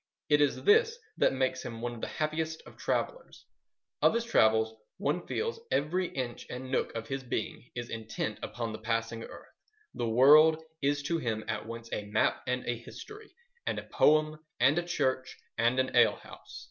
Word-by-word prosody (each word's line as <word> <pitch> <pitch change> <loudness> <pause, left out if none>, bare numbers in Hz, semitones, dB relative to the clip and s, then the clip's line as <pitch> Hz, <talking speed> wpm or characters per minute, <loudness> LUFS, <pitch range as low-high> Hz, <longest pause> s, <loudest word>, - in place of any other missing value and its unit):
It 145 0 +5
is 145 - +1
this 450 +2 +5 0.2
that - - +4
makes 130 -1 -1
him 115 -1 -6
one 120 +1 -3
of 115 - -9
the - - -2
happiest 160 +1 -2
of - - -13
travellers. - - -3 0.6
On - - +6
his 230 0 0
travels, 110 - +3 0.2
one 160 +5 -1
feels, 460 0 -2
every 180 +5 +1
inch 125 -5 -5
and 130 +1 -6
nook - - 0
of 115 -1 -4
his 135 0 -3
being 125 0 -4
is 120 -1 -5
intent 110 -1 -4
upon 115 -2 -4
the 110 - -6
passing 115 0 -2
earth. - - -12 0.4
The 115 - -2
world 155 +7 +7 0.2
is 145 +1 +1
to 165 +3 0
him 110 -6 -2
at - - -3
once 115 0 -7
a 105 - -3
map 105 - +1
and 125 0 -1
a 120 -1 -2
history 425 - -11 0.4
and - - 0
a - - -4
poem 155 0 +3 0.2
and 135 +7 +4
a - - -2
church 130 -6 -1 0.2
and 120 +3 +2
an 130 0 0
ale - - +6
house. - - -12
130 Hz, 185 wpm, -30 LUFS, 115-155 Hz, 0.6 s, world